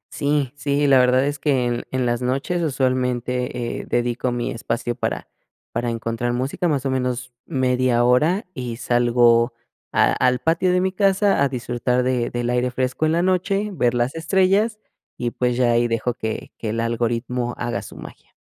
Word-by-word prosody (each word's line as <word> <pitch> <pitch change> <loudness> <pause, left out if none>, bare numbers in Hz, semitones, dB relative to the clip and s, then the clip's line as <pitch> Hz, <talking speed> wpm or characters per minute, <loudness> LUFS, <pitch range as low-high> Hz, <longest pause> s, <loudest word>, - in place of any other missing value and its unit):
Sí, 145 -3 0
sí, 145 0 0
la 135 -2 +6
verdad 125 +1 +4
es 145 0 -2
que 135 -6 +1
en 120 0 -2
en 130 -1 -1
las 120 0 0
noches, 135 +8 -1
usualmente, 125 -3 -1
eh, - - -7
dedico 120 +1 0
mi 120 -1 -2
espacio 115 +1 -3
para 120 - -3 0.4
para 120 +1 -2
encontrar 115 +1 -2
música, 130 +8 -1
más 140 -4 0
o 135 - 0
menos 125 -1 -2
media 130 -4 +1
hora, 150 - +3
y 120 -3 -5
salgo 120 0 +3 0.4
a - - +3
al 125 0 +2
patio 170 +5 +1
de 180 0 +2
mi 190 - +1
casa 195 -1 +2
a 140 - +3
disfrutar 125 0 -1
de 125 -2 0
del 120 0 -2
aire 125 +1 +1
fresco 130 +5 -1
en 155 - +1
la 170 +1 +2
noche, 195 +3 0
ver 120 -7 +1
las 120 +2 0
estrellas, 190 +6 +2 0.4
y 120 -1 -2
pues, 125 -1 -1
ya 120 -2 +3
ahí 120 0 +3
dejo 115 +1 -1
que 110 -1 -5
que 110 - -3
el 115 - -2
algoritmo 120 +1 -1
haga 120 - -2
su - - -11
magia. - - -12
125 Hz, 180 wpm, -22 LUFS, 120-145 Hz, 0.4 s, la